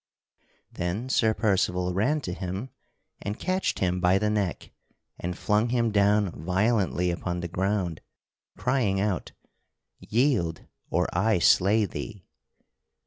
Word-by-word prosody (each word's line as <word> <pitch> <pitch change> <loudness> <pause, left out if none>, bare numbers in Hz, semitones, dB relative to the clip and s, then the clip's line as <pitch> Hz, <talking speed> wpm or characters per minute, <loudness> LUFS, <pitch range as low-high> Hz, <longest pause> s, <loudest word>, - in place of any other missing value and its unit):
Then 90 +9 -3
Sir 110 -4 +2
Percival 90 -4 +1
ran 130 +11 +1
to 90 - -4
him 95 +8 -5 0.5
and 105 +1 -4
catched 185 0 -1
him 90 -1 0
by 90 +2 +4
the 105 +1 0
neck 100 -5 -2 0.5
and 90 +1 -4
flung 105 +3 +1
him 115 -2 +1
down 100 -1 +3
violently 95 +1 +1
upon 90 0 -3
the 85 - -3
ground, 95 -1 -1 0.6
crying 105 -8 +1
out, 100 -4 -2 0.7
"Yield 110 - 0 0.2
or - - +1
I 105 +4 +3
slay 100 +5 +4
thee!" 100 -1 -7
100 Hz, 125 wpm, -27 LUFS, 90-110 Hz, 0.7 s, by